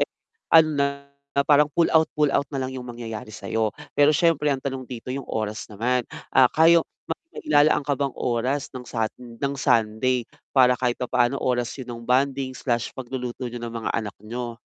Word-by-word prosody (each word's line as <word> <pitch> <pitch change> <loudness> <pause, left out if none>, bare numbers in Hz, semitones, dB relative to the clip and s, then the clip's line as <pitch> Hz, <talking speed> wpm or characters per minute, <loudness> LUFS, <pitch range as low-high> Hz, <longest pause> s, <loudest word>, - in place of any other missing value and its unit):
eh, - - +1 0.4
ano 160 -1 +7 0.6
na 140 0 +1
parang 150 0 +5
pull 165 +3 +3
out, 160 0 +5
pull 150 - +5
out - - +3
na 140 - -3
lang 130 0 -3
yung 130 - -5
mangyayari 115 -2 -7
sa'yo. 110 +1 -2 0.2
Pero 145 +1 +5
siyempre 155 -1 +2
ang 135 - 0
tanong 135 0 -4
dito 125 0 -6
yung 135 -1 -4
oras 110 -1 -3
naman. 120 +4 0 0.3
Ah, 130 -2 +6
kaya 165 +1 +5 0.5
mailalaan 150 - +2
ka 145 - +2
bang 140 0 -1
oras 125 +4 0
ng 125 - -6
Sun 115 0 -5
ng 140 +2 -1
Sunday 120 -1 +1 0.2
para 125 -2 +5
kahit 125 -1 -1
papaano 125 +1 +1
oras 125 -2 0
yun 130 - -6
ng 115 - -9
bonding/pagluluto 130 -1 -1
niyo 120 0 -7
ng 115 - -5
mga 115 - -3
anak 105 -3 -3
niyo. 120 +1 -5
125 Hz, 175 wpm, -24 LUFS, 120-140 Hz, 0.6 s, ano